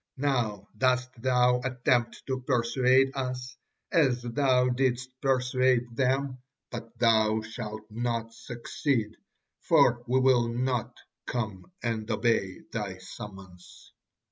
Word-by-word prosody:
Now 120 -8 -1
dost 125 +2 +1
thou 125 -1 +3
attempt 125 -2 0
to 130 -1 -2
persuade 130 +1 +3
us 125 -1 -4 0.4
as 130 -7 +3
thou 125 +1 +2
didst 130 0 0
persuade 130 -2 +2
them, 135 0 0 0.3
but 115 -1 -8
thou 110 -2 +3
shalt 110 -1 -7
not 115 0 -2
succeed, 120 -1 -2 0.4
for 120 0 +4
we 130 +2 +3
will 130 -2 +4
not 125 0 -2 0.3
come 110 - -4
and 115 -2 -2
obey 110 -4 0
thy 105 -4 -4
summons." 95 -2 -11
120 Hz, 110 wpm, -28 LUFS, 115-130 Hz, 0.4 s, for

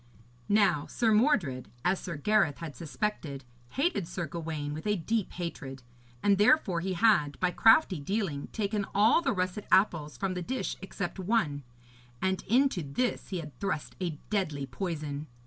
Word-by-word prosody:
Now 200 -8 +3
Sir 225 -2 +1
Mordred, 200 - +2 0.2
as 180 +1 +2
Sir 170 -4 -5
Gareth 190 -2 +2
had 160 -5 -7
suspected, 150 -2 -4 0.3
hated 275 - 0
Sir 180 0 -4
Gawaine 155 -2 -4
with 155 +7 -6
a 210 - +2
deep 210 +4 -1
hatred, 135 -7 -6 0.4
and 200 -1 +4
therefore 205 - +4
he 185 +2 -2
had, 170 -7 +3
by 180 -1 +2
crafty 225 - +5
dealing, 170 -3 -2
taken 205 -2 -2
all 215 +10 +5
the 275 - +1
russet 185 0 -2
apples 160 -8 +3
from 190 +7 -1
the 180 - -3
dish 255 +8 -3
except 195 -1 -5
one, 180 -8 0 0.6
and 190 +2 0
into 255 -3 +3
this 160 - -2
he 190 - -2
had 150 -6 -11
thrust 195 -7 -3
a 170 -4 -2
deadly 155 -9 -1
poison. 150 0 -4
180 Hz, 160 wpm, -29 LUFS, 150-210 Hz, 0.6 s, crafty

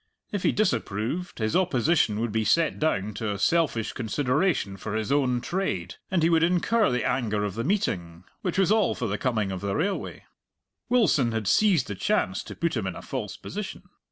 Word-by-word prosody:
If 205 -3 -2
he - - +3
disapproved, 130 - -1
his 110 -1 -1
opposition 150 - +2
would 115 -1 -1
be 110 +1 0
set 165 +8 +2
down 105 -10 0
to 110 0 -3
a 100 - -3
selfish 145 -2 +1
consideration 130 - 0
for 100 +2 -5
his 110 +2 -2
own 130 -4 +2
trade, 95 - -2
and 180 -4 +1
he 165 - +4
would 165 -1 +4
incur 180 +7 +3
the 125 0 0
anger 105 -5 0
of 100 -2 -2
the 115 +3 -3
meeting, 90 - -1 0.2
which 180 -1 -2
was 195 0 +3
all 215 -3 +3
for 125 - -3
the 105 +1 -2
coming 110 -7 0
of 95 - -4
the 100 -1 -2
railway, 190 +6 -2 0.7
Wilson 170 - +3
had 110 -3 -2
seized 180 - +4
the 100 - -5
chance 95 0 0
to - - -8
put 170 -3 -1
him 110 -5 -1
in 95 - -4
a - - -9
false - - -5
position. - - -6
125 Hz, 200 wpm, -26 LUFS, 105-170 Hz, 0.7 s, he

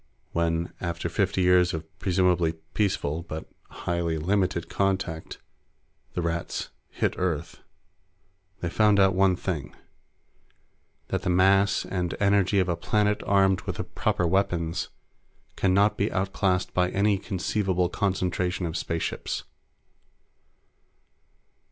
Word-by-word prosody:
When, 85 0 0
after 85 -1 -3
fifty 95 +1 +1
years 90 -1 +4
of 80 0 -5
presumably 90 -3 +2 0.2
peaceful 90 -6 0
but 80 -2 -7 0.2
highly 85 -2 -2
limited 90 0 0
contact, 95 -4 -1 0.8
the 90 - -1
Rats 85 0 -3 0.2
hit - - -1
Earth, 85 -2 -2 1.0
they 85 - -1
found 105 0 +4
out 95 -1 +5
one 95 0 +3
thing. 85 -8 -4 1.3
That - - -1
the - - -2
mass 95 +2 +4
and 90 -2 -2
energy 100 -1 +3
of 95 -2 +3
a 85 - +1
planet 105 +4 +1
armed 95 -1 +3
with - - -2
the - - -3
proper 90 - -1
weapons 85 -2 0 0.7
can 95 - +1
not 100 +3 +3
be 100 - 0
out 95 +1 -1
classed 95 -2 0
by 90 0 +2
any 100 +1 +2
conceivable 95 -1 0
concentration 90 -1 -1
of 80 -1 -4
spaceships. 85 0 -3
90 Hz, 120 wpm, -26 LUFS, 85-95 Hz, 1.3 s, out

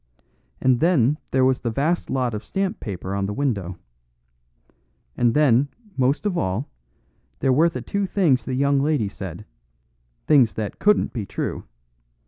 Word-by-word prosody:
And 130 -2 +3
then 150 -5 +3
there 130 -1 +3
was 130 0 +2
the 120 - -2
vast 150 +9 -1
lot 125 -3 0
of 105 - -4
stamp 195 -1 -2
paper 95 -2 -5
on 100 0 -1
the 105 - -4
window. 100 -10 -2 1.4
And 120 -1 +2
then, 140 -2 +4 0.3
most 135 +8 +1
of 200 -3 0
all, 105 - -1 0.7
there 130 - +2
were 160 +6 +4
the 170 - -6
two 200 -1 -2
things 160 - +2
the 130 +2 -3
young 140 +1 +2
lady 145 -7 +1
said 95 0 -8 0.8
things 135 -7 +4
that 105 -2 -4
couldn't 210 0 +2
be 110 -6 -4
true. - - -4
130 Hz, 155 wpm, -23 LUFS, 110-150 Hz, 1.4 s, then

